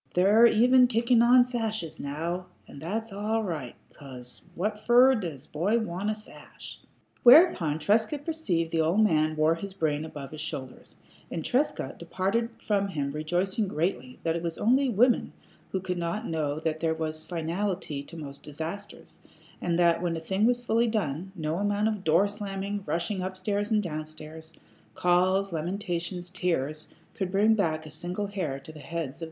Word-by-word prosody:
They're 205 +6 +6
even 250 +3 +5
kicking 235 0 +3
on 245 +1 +6
sashes 220 -8 -3
now, 170 +6 -3 0.2
and 140 - -11
that's 215 +6 -3
all 215 +3 -1
right, 155 - -4 0.2
'cause 125 -3 -10
what 210 +4 -2
fer 250 +2 +7
does 165 - -4
a - - -27
boy 190 +9 +1
want 205 -2 -2
a 215 - 0
sash?" 215 - -10 0.4
Whereupon 245 - +6
Trescott 220 - +1
perceived 185 - -1
that 165 - 0
the - - +4
old 170 +6 +2
man 155 -5 +2
wore 155 +1 +3
his 190 +3 -7
brains 155 -3 -1
above 140 -3 -8
his 155 0 -7
shoulders, 130 -4 -7 0.3
and 165 - -4
Trescott 250 - -1
departed 195 +7 -1 0.2
from 200 -2 +1
him 145 -7 -3
rejoicing 180 +8 -1
greatly 150 -7 -2
that 165 0 0
it 170 - -2
was 165 -1 -3
only 260 +5 +3
women 240 +3 +3 0.4
who 190 - -1
could 180 -1 -3
not 170 +7 -2
know 155 -2 -1
that 160 0 -2
there 160 -1 0
was 155 -1 -3
finality 170 -2 -3
to 165 +4 -11
most 140 -3 -7
disasters, 160 +7 -7 0.4
and 170 -1 0
that 170 -1 +3
when 170 -2 -1
a - - -3
thing 190 +6 +1
was 245 0 +1
fully 230 +1 +2
done, 190 -5 -2
no 160 -1 -2
amount 205 +2 +1
of 210 -3 -2
door 165 +5 +4
slammings, 200 -1 -4
rushing 175 +3 -1
up 185 0 -4
stairs 205 +2 -1
and 215 -2 +2
down 155 -3 -3
stairs, 155 +1 -10 0.4
calls, 185 +2 +2
lamentations, 175 +1 -3
tears, 155 -5 -2 0.3
could 190 -2 -3
bring 210 +3 +4
back 160 -7 0
a 155 - -9
single 180 +6 -3
hair 180 -9 -3
to 140 - -12
the 155 - -12
heads 165 -1 -4
of - - -11
twins. 160 - -20
180 Hz, 180 wpm, -28 LUFS, 160-210 Hz, 0.4 s, fer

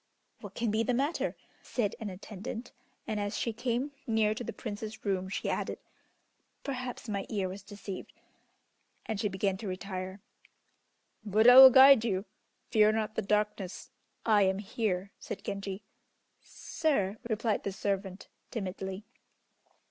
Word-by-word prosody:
"What - - -10
can 230 -2 0
be 220 +1 +1
the 240 +2 +1
matter," 285 +6 0 0.3
said 210 -5 -2
an 220 -3 -4
attendant, 210 +5 -7 0.3
and 215 -1 -2
as 205 0 -2
she 230 - -1
came 245 +4 -1 0.2
near 220 -2 +2
to 235 - -6
the - - -4
Prince's 220 0 -7
room 190 -2 -1
she - - -3
added, - - -2 0.9
"Perhaps 255 -3 -5
my 200 -2 -3
ear 200 -4 -1
was 190 +2 -7
deceived," 200 -1 -8 0.9
and 220 -4 -3
she 210 - 0
began 190 0 -1
to 205 - -6
retire. 185 0 -5 1.0
"Buddha 220 +4 +6
will 265 +1 +12
guide 265 -2 +8
you; 195 -3 -1 0.5
fear 215 -3 +5
not 215 -1 -1
the 220 - -1
darkness, 210 -2 -1 0.3
I 215 -2 +5
am 190 -1 +3
here," 200 -2 -2
said - - -7
Genji. 200 0 -5 0.6
"Sir!" 215 - -1
replied 220 0 0
the 200 - -3
servant, 195 0 -3 0.2
timidly. 190 -1 -5
210 Hz, 140 wpm, -30 LUFS, 195-230 Hz, 1.0 s, will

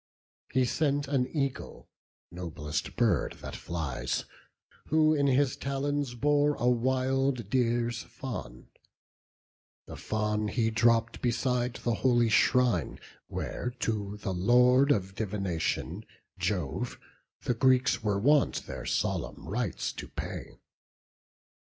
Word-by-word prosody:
He 130 -1 +3
sent 145 +1 0
an 135 -3 +1
eagle, 140 -2 -3 0.4
noblest 80 -4 -4
bird - - +2
that - - -6
flies, 80 -7 -3 0.6
Who 155 0 +4
in 140 -2 +2
his 135 0 +3
talons 140 -1 -2
bore 145 +3 +2
a 120 - 0
wild 130 -1 +1
deer's 120 -1 +1
fawn: 60 - -7 1.2
The - - -9
fawn 105 0 -1
he 115 0 0
dropp'd 115 0 +2
beside 125 0 0
the 120 - -1
holy 120 0 +3
shrine, 115 - +3 0.3
Where 125 0 -4
to 105 -2 -2
the 100 -2 -3
Lord 125 +8 +5
of 95 -7 0
divination, 95 -5 -2 0.4
Jove, - - -2 0.4
The 125 - +1
Greeks 130 0 +3
were 105 -2 0
wont 140 +7 +3
their 65 0 -6
solemn - - -2
rites 105 -2 -2
to - - -7
pay. - - -7
120 Hz, 115 wpm, -29 LUFS, 105-135 Hz, 1.2 s, Lord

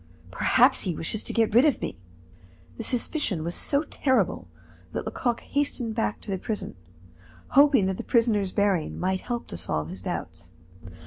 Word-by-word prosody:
Perhaps 95 - +4
he 175 - -2
wishes 205 +8 -2
to - - -4
get 225 -3 +1
rid 240 +3 +7
of 295 -3 +3
me." - - -4 0.8
This - - -3
suspicion 240 - -1
was 170 +1 -3
so 285 - +2
terrible 260 -3 0 0.5
that - - -3
Lecoq 240 -2 -1
hastened 275 -5 -1
back 220 -2 -1
to - - -6
the 190 - -2
prison, 215 +2 -4 0.8
hoping 275 -6 +5
that 190 0 -1
the - - -5
prisoner's 220 -5 +2
bearing 195 -6 0
might 185 +1 0
help 240 -1 -4
to 85 - -6
solve 80 -3 -2
his 95 +1 -7
doubts. 85 -2 -5
210 Hz, 170 wpm, -26 LUFS, 175-245 Hz, 0.8 s, rid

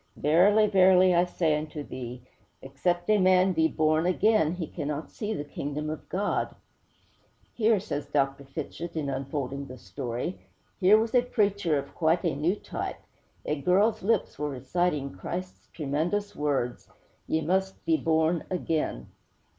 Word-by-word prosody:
'Verily, 190 +8 +4
verily, 185 -2 +5
I 175 +1 +4
say 165 -3 +1
unto 150 0 -4
thee, 125 -2 -7 0.4
except 175 +6 -1
a 210 - +4
man 185 0 +4
be 160 -1 +3
born 155 +1 +1
again, 185 -3 +3
he 180 -2 -4
cannot 150 -1 -5
see 215 -1 -4
the 205 - -2
Kingdom 145 +1 -4
of 155 - -8
God!' 200 +2 -1 1.0
'Here,' 220 -2 +3
says 150 -8 -4
Dr. 140 -1 0
Fitchett, 155 +4 -6
in 145 -3 -2
unfolding 135 0 -4
the 130 - -9
story, 120 - -5 0.4
'here 200 +3 +6
was 220 +1 -1
a 250 - +6
preacher 200 - +1
of 140 0 -5
quite 165 +2 +1
a 165 -6 0
new 160 +7 +1
type! - - -5 0.5
A 150 -1 -2
girl's 200 +7 +3
lips 210 -6 0
were 150 0 -1
reciting 140 +2 -1
Christ's 185 +1 -6
tremendous 175 +8 -2
words: 140 -5 -1 0.4
"_Ye 160 0 0
must 190 +3 -1
be 330 - +3
born 160 - +1
again! 160 - -2
160 Hz, 150 wpm, -27 LUFS, 145-185 Hz, 1.0 s, here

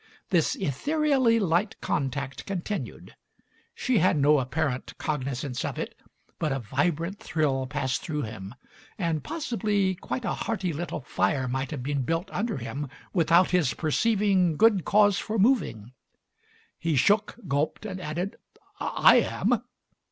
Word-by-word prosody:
This 170 -4 +3
ethereally 265 - +2
light 185 +1 0
contact 135 -1 -3
continued. 190 - -5 0.6
She 250 -5 +1
had 180 -2 +3
no 145 +1 +5
apparent 130 0 -2
cognizance 135 -1 -3
of 145 -4 -3
it, - - -4 0.5
but 155 -3 0
a 135 - 0
vibrant 165 - -1
thrill 135 -4 0
passed 130 -1 -1
through 150 -3 -3
him, 110 0 -7 0.4
and 165 -6 -1
possibly 210 - 0
quite 230 +7 -5
a - - 0
hearty 195 -7 -2
little 165 0 -4
fire 125 +3 0
might 130 +1 -2
have 140 -5 -5
been 140 +1 -1
built 165 +8 -2
under 215 -1 -2
him 135 +4 -5 0.2
without 170 0 +4
his 175 -8 +2
perceiving 190 0 +2
good 215 -5 +4
cause 205 -1 +4
for 220 0 -3
moving. 190 - +1 0.9
He 165 -2 0
shook, 205 - +3
gulped, 145 +8 -1
and 190 -3 -5
added: 175 +5 -3 0.4
"I - - +5
am!" - - +1
160 Hz, 135 wpm, -27 LUFS, 135-200 Hz, 0.9 s, no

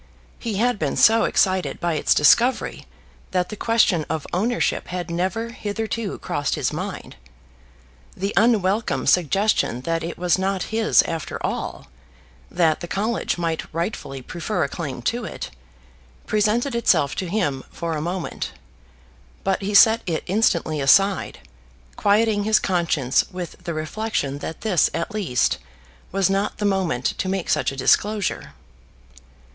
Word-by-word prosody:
He 225 -4 -3
had 235 +1 +1
been - - -1
so 225 +1 +5
excited 185 -1 +1
by 170 -1 0
its 155 - +2
discovery 235 - +3 0.4
that 180 -1 0
the 215 - -5
question 215 -6 +2
of 160 -2 -2
ownership 230 +7 0
had 180 -1 -4
never 190 +7 -1
hitherto 220 -1 -4
crossed 145 -6 -2
his - - -1
mind. - - -6 1.0
The 195 +2 -2
unwelcome 215 -1 +2
suggestion 180 - +2
that 165 +3 -2
it 170 - -5
was 180 +1 +1
not 190 -1 0
his 220 0 +4
after 165 -2 -4
all, - - -4 0.6
that 165 -3 +2
the 175 - -6
College 215 +4 -1
might 165 -2 -3
rightfully 160 - -4
prefer 180 +8 -2
a - - 0
claim 140 -7 -6
to 240 - -1
it, - - -6 0.7
presented 215 +5 +1
itself 170 -11 +2
to 185 - -2
him 145 -10 -1
for 170 -1 -4
a 150 - -3
moment; 175 +2 -4 0.9
but 195 0 0
he 200 +1 -2
set 220 +2 +7
it 165 -3 -1
instantly 170 -6 +1
aside, 195 +8 +3 0.5
quieting 205 0 +2
his 215 +1 +4
conscience 165 -8 +1
with 180 -2 -6
the 170 - -2
reflection 155 -4 -2
that 160 - -6
this 185 -9 +3
at 170 - -3
least 180 -13 0 0.5
was 195 0 +2
not 195 +1 -1
the 210 - -2
moment 185 -11 0
to 185 - -1
make 190 -2 -2
such - - +1
a - - -7
disclosure. 190 - +1
185 Hz, 145 wpm, -22 LUFS, 165-215 Hz, 1.0 s, set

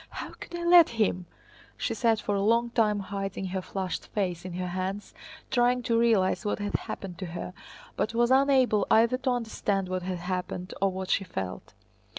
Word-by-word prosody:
"How - - -7
could 345 - -10
I 345 - -4
let 345 -1 +7
him?" 185 -5 +1 0.5
She - - -1
sat 230 -3 +2
for 205 - -2
a 200 - +1
long 230 +3 +2
time 210 -3 +2
hiding 195 0 -4
her 190 - -1
flushed 190 0 -4
face 180 -4 -2
in 185 - -6
her 180 0 -3
hands 185 +3 -4 0.4
trying 245 0 +3
to 230 0 +2
realize 220 -6 +3
what 205 - -1
had 205 -1 -4
happened 180 -3 -4
to 185 - -4
her, 175 +1 -6 0.4
but 225 - -1
was 240 +1 +3
unable 260 -6 +4
either 235 +3 +4
to 265 - -1
understand 215 -5 -1
what 185 0 -2
had 180 0 -3
happened 180 0 -4
or 195 -1 +3
what 190 0 -4
she 195 - +2
felt. 95 - -6
200 Hz, 190 wpm, -28 LUFS, 185-235 Hz, 0.5 s, let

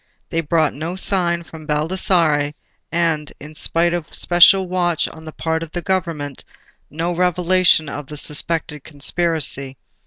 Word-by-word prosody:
They 165 - 0
brought 160 -1 +1
no 160 +5 -5
sign 175 -3 +1
from 160 -2 -12
Baldassarre, 150 -2 +1 0.4
and, 165 -3 0
in 150 +2 -11
spite 170 +3 +1
of 175 -3 -4
special 185 +2 +5
watch 175 -2 0
on 160 0 -11
the 155 - -7
part 160 +1 -2
of 165 -1 -7
the 175 - -4
Government, 165 -7 -2 0.5
no 165 +4 -2
revelation 180 -1 +3
of 145 0 -6
the 150 - -8
suspected 150 0 -2
conspiracy. 145 -3 -1
165 Hz, 145 wpm, -20 LUFS, 150-175 Hz, 0.5 s, special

